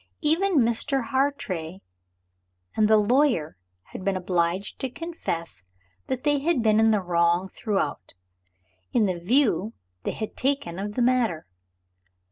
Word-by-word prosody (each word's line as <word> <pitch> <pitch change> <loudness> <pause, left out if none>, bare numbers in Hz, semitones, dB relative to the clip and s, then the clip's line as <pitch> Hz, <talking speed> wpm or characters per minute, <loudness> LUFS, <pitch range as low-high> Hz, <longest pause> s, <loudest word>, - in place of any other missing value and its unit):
Even 345 +5 +4
Mr. 245 +1 +1
Hartrey 195 - -2 0.9
and 215 - +3
the 220 0 +5
lawyer 235 - +2 0.4
had - - -7
been 195 0 0
obliged 180 +1 -1
to 265 - -2
confess 255 - -5 0.5
that 255 -1 -3
they 290 -1 +2
had 290 -4 0
been 215 -1 +4
in 225 0 +5
the 210 -3 +2
wrong 175 +1 +1
throughout, 195 - -3 0.8
in 225 - +3
the 185 -3 -2
view 215 - +2 0.3
they - - -3
had 215 - -6
taken 265 -10 -1
of 205 +1 -5
the 245 - +1
matter. 235 -10 +1
220 Hz, 135 wpm, -25 LUFS, 180-265 Hz, 0.9 s, the